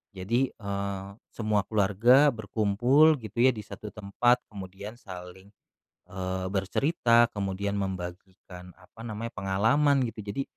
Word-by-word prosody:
Jadi, 115 +8 0
eee, 100 -2 -5 0.2
semua 110 -2 0
keluarga 110 +7 +4
berkumpul 120 +8 +3
gitu 110 0 -10
ya, 130 - +6
di 110 - -7
satu 105 - -8
tempat, 120 +4 +1
kemudian 100 +2 -9
saling, 95 -2 -11 0.6
eee, 95 0 -4
bercerita, 120 - +2
kemudian 100 0 -2
membagikan 90 -1 -7
apa - - -18
namanya, 115 +1 -5
pengalaman 125 +9 +2
gitu. 115 -1 -7
Jadi, 100 +7 -3
100 Hz, 120 wpm, -27 LUFS, 95-120 Hz, 0.6 s, ya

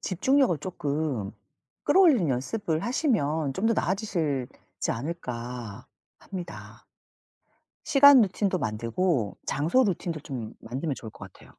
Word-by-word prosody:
집중력을 260 - +2
쪼끔 145 - -3 0.5
끌어올리는 290 - +5
연습을 160 - -1
하시면 160 - 0
좀 200 - 0
더 230 - +3
나아지실지 170 - -2
않을까 120 -5 -5 0.3
합니다. 175 -3 -9 1.0
시간 285 -3 +7
루틴도 195 -2 0
만들고 115 - -1
장소 165 - +2
루틴도 175 -5 -2
좀 125 -7 -6
만들면 135 +7 -3
좋을 110 -3 -9
것 - - -11
같아요. - - -18
160 Hz, 275 characters per minute, -27 LUFS, 125-205 Hz, 1.0 s, 시간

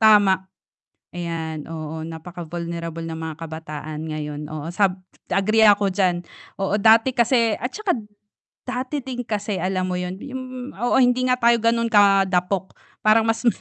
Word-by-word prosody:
Tama, 200 -3 +5 0.7
ayan, 165 -3 -4
oo, 160 0 -5
napaka-vulnerable 165 0 -6
ng 165 - -4
mga 160 -1 -5
kabataan 155 -1 -6
ngayon, 150 -1 -5
oo, 155 0 -5
sab 190 -1 +2 0.3
agree 215 +3 +3
ako 205 -2 +5
diyan, 180 -3 +1 0.3
oo. 195 0 0
Dati 225 +4 +5
kasi 235 -2 +3
at 250 +4 -4
tsaka 425 -4 -1 0.7
dati 255 +3 -3
din 255 -2 -5
kasi 205 -5 -3
alam 185 0 0
mo 180 - -2
yun, 180 +1 -3
yung 255 0 -7
oo, 240 +6 +1
hindi 250 -1 +4
nga 250 - +3
tayo 235 -1 +4
gano'n 230 0 +2
kadapok, 195 -2 +3 0.2
parang 215 +1 +4
mas 225 +2 -1
195 Hz, 145 wpm, -22 LUFS, 165-230 Hz, 0.7 s, Tama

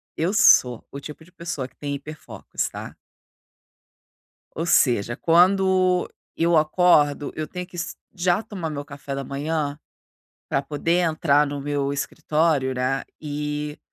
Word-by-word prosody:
Eu 165 +4 0
sou 125 - +5
o 140 - -6
tipo 150 +2 -10
de 180 - -21
pessoa 160 -7 -5
que - - -29
tem 145 -1 -4
hiperfocos, 150 +2 -5
tá? - - -8 1.6
Ou 165 - 0
seja, 120 -9 +3
quando 185 +1 +3 0.3
eu 170 0 +2
acordo, 155 -2 +3
eu 155 - -3
tenho 180 +3 -6
que 180 - -13
es 175 +1 -4 0.2
já 180 +1 +1
tomar 190 -7 -5
meu 145 -1 -5
café 140 -1 -7
da 140 - -3
manhã 145 +1 -2 0.7
pra 135 - 0
poder 155 +5 0
entrar 155 -3 +3
no 145 0 -4
meu 140 0 -1
escritório, 145 -1 0
né, 130 +2 -1 0.2
e 150 0 -4
150 Hz, 140 wpm, -23 LUFS, 140-170 Hz, 1.6 s, sou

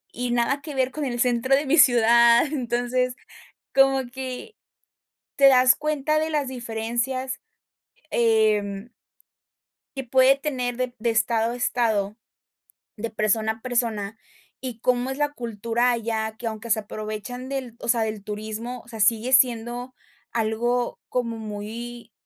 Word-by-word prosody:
y 245 +1 -2
nada 245 +4 +1
que 300 -2 -6
ver 260 -1 +1
con 300 +1 -3
el 240 -2 -3
centro 250 +2 +3
de 285 - 0
mi 320 - +3
ciudad. 235 -3 +6
Entonces, 250 -2 -1 0.6
como 270 -1 +4
que 260 - -7 0.8
te 275 - +6
das 255 -1 +6
cuenta 305 0 0
de 315 - 0
las 290 -4 0
diferencias, 240 +2 -3 0.7
em 215 -2 +2 1.1
que 270 - -3
puede 260 +2 +5
tener 255 -4 -3
de 255 -1 -2
de 235 - 0
estado 225 0 +1
a - - -5
estado, 220 -4 0 0.8
de 230 +1 -4
persona 215 +1 +1
a 220 - -15
persona, 225 -4 -2 0.4
y 245 -4 -6
cómo 250 +1 +1
es 265 - -5
la 295 - +2
cultura 235 +1 0
allá, 220 -1 -2
que, 235 - -6
aunque 220 +1 -7
se 220 0 +3
aprovechan 215 +4 -6
del 260 -4 -5
o - - -6
sea, 230 -1 +3
del 215 -2 -3
turismo, 220 +3 -5
o - - -22
sea, 225 -2 -8
sigue 225 +4 +2
siendo 245 0 +2 0.4
algo 235 +2 0
como 235 -2 -2
muy 220 +2 -7
240 Hz, 145 wpm, -24 LUFS, 225-255 Hz, 1.1 s, ciudad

